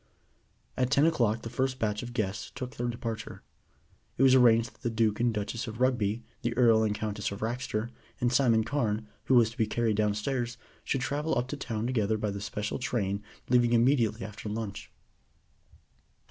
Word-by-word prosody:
At 125 -1 +1
ten 140 +2 +4
o'clock 120 -9 +2
the 115 - -5
first 130 +1 -1
batch 105 -3 -1
of 120 -1 -7
guests 105 0 -2
took 130 0 -6
their 120 - -2
departure. 115 -2 -5 0.7
It 135 - +3
was 130 -1 +7
arranged 115 -3 +5
that - - -28
the 120 - -1
Duke 110 -2 +1
and 120 0 +3
Duchess 105 +2 -3
of 110 +1 -7
Rugby, 120 -4 +1 0.2
the 120 0 -2
Earl 115 -3 +5
and 105 -1 +1
Countess 105 -1 -3
of 100 - -7
Raxter, 115 -1 -2 0.3
and 120 0 +1
Simon 115 -4 +4
Carne, 110 -4 -1 0.2
who 130 - +3
was 115 -2 +5
to 115 - -15
be 110 - +3
carried 110 -1 0
downstairs, 115 +3 -1 0.3
should 135 - -1
travel 150 +3 -1
up 125 +1 0
to 145 - -3
town 115 -6 -3
together 110 -4 +1
by 105 -1 -2
the 100 0 -5
special 105 +2 -3
train 100 -6 -1 0.3
leaving 120 -1 +3
immediately 120 -4 +3
after 105 +1 -7
lunch. 105 -1 -5
115 Hz, 185 wpm, -29 LUFS, 105-125 Hz, 0.7 s, was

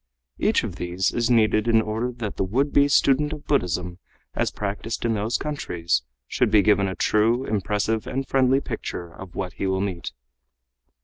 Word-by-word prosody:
Each - - +2
of - - -5
these 90 +2 -1
is 120 0 0
needed 110 -2 +3
in 115 -1 +5
order 110 +3 -2
that 120 -4 -5
the - - +1
would 130 +10 0
be 140 0 +5
student 145 +1 +3
of 150 -1 -9
Buddhism 90 - -1 0.3
as - - 0
practiced 105 +3 -4
in 115 - +2
those 110 +3 0
countries 85 - -1 0.3
should 125 - +1
be 105 -1 +5
given 105 -2 +3
a 95 - -3
true, 115 +8 +2
impressive 105 +2 -1
and 135 0 -3
friendly 135 0 +3
picture 85 -9 -6
of 95 -2 -11
what 90 -2 -4
he 95 - -3
will 95 0 0
meet. 95 -4 -3
110 Hz, 180 wpm, -24 LUFS, 95-125 Hz, 0.3 s, in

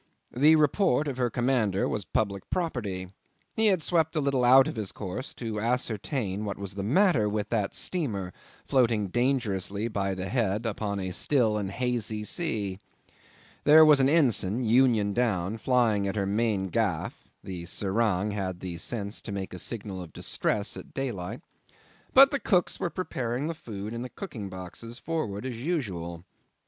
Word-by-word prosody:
The 150 +5 +6
report 155 -1 +2
of 135 -3 -3
her 125 -1 +1
commander 120 -6 +1
was 105 -3 -3
public 100 -3 -2
property. 105 - -2 0.5
He 220 -1 +3
had 185 -6 +2
swept 165 -2 +1
a - - +2
little 140 -3 +1
out 130 +2 +7
of - - -4
his 105 -4 -3
course 105 +8 -6
to 110 -3 -4
ascertain 110 -2 -1
what 100 -1 -4
was 100 -1 -5
the 100 - -4
matter 135 - +3
with 105 0 -2
that 105 -4 -1
steamer 105 - -2 0.3
floating 115 -7 +2
dangerously 110 -4 0
by 100 -3 -1
the 95 +1 -4
head 110 -2 0
upon 105 -2 -2
a 95 -1 -3
still 115 +2 +2
and 100 -2 -2
hazy 115 -1 -2
sea. 105 - -1 0.8
There 155 +2 +8
was 150 -2 +6
an 135 0 +4
ensign, 125 - +2
union 115 -3 +3
down, 110 -3 0
flying 110 -5 +2
at 95 - -2
her 100 -2 0
main 100 -1 0
gaff 100 -5 -1 0.2
(the 90 -3 -6
serang 100 0 0
had 95 -3 -3
the 90 -2 -5
sense 100 0 -4
to 105 - -7
make 95 -2 -4
a 90 - -6
signal 100 -3 -4
of 85 -3 -10
distress 105 -1 -1
at - - -11
daylight); 120 -4 -4 0.7
but 275 +1 +8
the 280 - 0
cooks 180 -7 +1
were 175 - -1
preparing 130 -8 -3
the 165 - -2
food 110 -8 -7
in 115 - -4
the 125 - -5
cooking 120 - -7
boxes 95 +6 -8
forward 130 -11 -3
as 120 -3 -5
usual. 95 - -3
110 Hz, 170 wpm, -28 LUFS, 100-130 Hz, 0.8 s, There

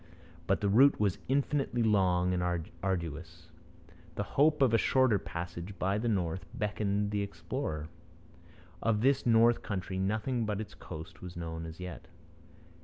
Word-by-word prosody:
But 95 - +2
the 100 - +1
route 130 +8 +5
was 100 -3 +1
infinitely 135 -2 +1
long 90 -4 +3
and 90 - 0 0.4
arduous. 85 -2 -4 0.6
The 100 - -1
hope 150 +6 +3
of 125 -4 +3
a - - +6
shorter 130 -6 +3
passage 85 +3 -6
by 95 +3 0
the 120 - -1
north 95 -3 -1
beckoned 105 -1 -1
the 105 -1 0
explorer. 80 -6 -4 0.9
Of 110 -2 +1
this 135 +1 +2
north 115 +1 +5
country 95 -2 -3
nothing 110 +5 0
but 105 -2 -2
its 105 -1 -6
coast 80 +2 -9
was 90 -1 -8
known 80 -1 -5
as 80 +1 -10
yet. 90 -1 -7
100 Hz, 150 wpm, -31 LUFS, 90-115 Hz, 0.9 s, a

